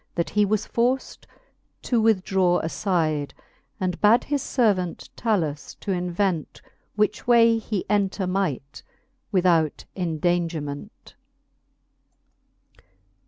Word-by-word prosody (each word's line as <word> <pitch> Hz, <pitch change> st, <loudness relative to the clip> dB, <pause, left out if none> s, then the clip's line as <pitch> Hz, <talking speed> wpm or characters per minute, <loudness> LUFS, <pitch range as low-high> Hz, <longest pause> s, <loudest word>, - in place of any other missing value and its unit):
That 170 Hz, -, -1 dB
he 210 Hz, 0 st, +3 dB
was 210 Hz, +1 st, 0 dB
forced 250 Hz, +3 st, -1 dB, 0.6 s
to 240 Hz, -3 st, +1 dB
withdraw 190 Hz, -4 st, +2 dB
afide; 160 Hz, -4 st, -1 dB, 0.4 s
And 180 Hz, -2 st, -2 dB
bad 220 Hz, +3 st, +5 dB
his 285 Hz, -1 st, -1 dB
fervant 200 Hz, -9 st, 0 dB
Talus 165 Hz, -11 st, -1 dB
to 200 Hz, -, -5 dB
invent 180 Hz, -2 st, -1 dB, 0.4 s
Which 210 Hz, +1 st, 0 dB
way 230 Hz, -1 st, +5 dB
he 215 Hz, -3 st, -3 dB
enter 200 Hz, -1 st, 0 dB
might, 180 Hz, -8 st, -2 dB, 0.5 s
without 175 Hz, -5 st, +2 dB
endangerment. 165 Hz, -4 st, -3 dB
185 Hz, 95 wpm, -24 LUFS, 170-210 Hz, 0.6 s, bad